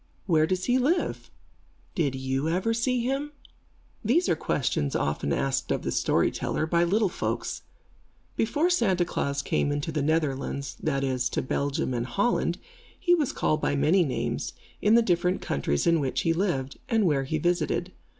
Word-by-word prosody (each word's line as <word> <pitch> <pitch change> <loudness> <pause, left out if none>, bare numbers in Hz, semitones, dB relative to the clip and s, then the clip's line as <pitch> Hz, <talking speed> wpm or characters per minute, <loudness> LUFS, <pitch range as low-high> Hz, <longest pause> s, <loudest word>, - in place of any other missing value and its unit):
Where 160 -4 +3
does 185 +1 -1
he 250 +1 +3
live? 325 +8 0 0.6
Did 145 -6 0
you 135 +3 -1
ever 185 +7 +1
see 245 +2 0
him? 275 +4 -2 0.7
These 285 - +2
are - - +3
questions, 115 - -1
often 70 0 -1
asked 135 - 0
of - - -1
the - - -2
storyteller, - - +1
by 170 +1 +2
little 205 +5 +2
folks. 180 - -3 0.7
Before 300 +10 +1
Santa 190 - +2
Klaas 140 -4 -2
came 145 - 0
into 145 +2 -2
the 150 -1 -1
Netherlands, 140 -2 -1
that 140 -3 0
is, 130 -2 0
to - - -2
Belgium 140 0 -1
and 120 0 -2
Holland, 240 - 0 0.4
he 350 - +3
was 310 -6 +2
called 155 0 0
by - - +1
many 155 +7 +4
names, 135 -6 -2 0.3
in 210 +2 +5
the 235 - +5
different 180 -2 +1
countries 70 +1 -1
in 170 -1 +4
which 135 -3 -1
he 165 - +2
lived, 155 -7 -1
and 225 -3 +3
where 140 -5 +2
he 155 +4 -1
visited. 175 +2 0
165 Hz, 170 wpm, -27 LUFS, 140-210 Hz, 0.7 s, in